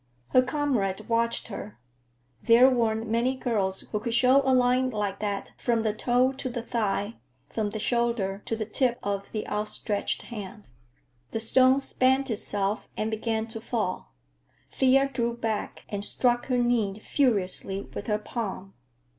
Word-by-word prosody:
Her 255 - +5
comrade 250 -8 -1
watched 230 0 +1
her; 205 0 -7 0.6
there 240 +2 +7
weren't 225 -2 0
many 235 +4 +1
girls 205 -7 0
who 210 - -4
could 235 +1 -2
show 255 +3 +5
a - - +2
line 255 0 +3
like 205 -4 -2
that 205 -2 -3
from 230 -2 0
the 215 -2 +1
toe 245 +4 +2
to 265 -1 -5
the 240 -1 -4
thigh, 220 -2 -1 0.3
from 215 -2 -1
the 215 - -5
shoulder 225 -4 0
to 225 - 0
the 220 -1 -3
tip 240 +2 +1
of 200 -1 -3
the 215 - -4
outstretched 210 0 -2
hand. 210 -1 -8 0.7
The 225 - -3
stone 260 +4 +4
spent 265 0 +2
itself 205 -1 0
and 215 +1 -1
began 220 0 -1
to 225 0 -6
fall. 210 - -3 0.6
Thea 270 +1 +4
drew 235 -3 -2
back 225 -3 -3
and 200 -1 -2
struck 240 +3 +1
her 255 -2 +1
knee 235 -5 +1
furiously 200 -6 0
with - - -6
her 210 -2 +1
palm. 205 -3 -5
230 Hz, 155 wpm, -27 LUFS, 210-250 Hz, 0.7 s, there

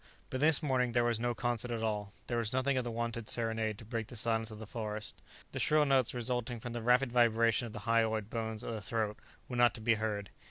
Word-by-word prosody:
But 130 - -2
this 155 +2 +4
morning 125 -4 +1
there 120 0 +3
was 120 -2 +2
no 120 0 0
concert 120 0 -1
at 115 -2 -2
all. 105 -2 -2
There 120 -1 -1
was 115 -2 -1
nothing 130 +1 +1
of 130 - +1
the 120 - -3
wonted 115 -1 -3
serenade 110 -2 0
to 115 - -11
break 115 -1 -3
the 120 - -10
silence 115 0 0
of 110 - -8
the 110 - -8
forest. 105 -1 -4 0.4
The - - -4
shrill 150 -1 +4
notes 135 -3 +3
resulting 120 0 -1
from 120 +1 -6
the 120 - -3
rapid 125 +2 +3
vibration 115 -1 +3
of 110 - -10
the 105 - -6
hyoid 110 -1 +1
bones 110 0 -3
of 115 - -4
the 110 - -4
throat 110 0 -2 0.3
were 125 - -4
not 120 0 +5
to - - -7
be 115 +1 +4
heard. 105 -3 -2
115 Hz, 245 wpm, -33 LUFS, 110-120 Hz, 0.4 s, not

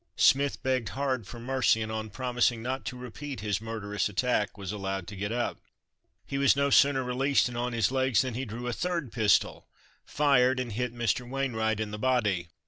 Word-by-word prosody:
Smith 140 +1 +3
begged 130 -5 0
hard 130 -6 -1
for 120 - -9
mercy, 130 -1 +2
and 110 0 -3
on 110 0 -4
promising 120 0 0
not 130 +2 -3
to 125 - -5
repeat 125 0 -7
his 105 -1 -1
murderous 105 -2 -2
attack, 105 0 0
was 100 -2 -5
allowed 95 -2 -3
to 105 - -9
get 100 +2 -3
up. 120 +1 -2 0.6
He 140 - -3
was 140 -1 +5
no 140 0 +1
sooner 135 -1 +5
released 130 +3 +2
and 125 - -7
on 120 +1 -2
his 115 0 +1
legs 130 -3 +2
than 130 -2 -3
he 130 +3 -3
drew 120 +2 -6
a 120 - -2
third 170 -4 -2
pistol, 110 -3 +2 0.4
fired, 130 -3 +3
and 125 -2 -3
hit 125 +3 -2
Mr. 120 +1 -1
Wainwright 110 -5 -1
in 110 -1 -3
the 105 - -6
body. 105 -9 +1
120 Hz, 200 wpm, -28 LUFS, 110-130 Hz, 0.6 s, was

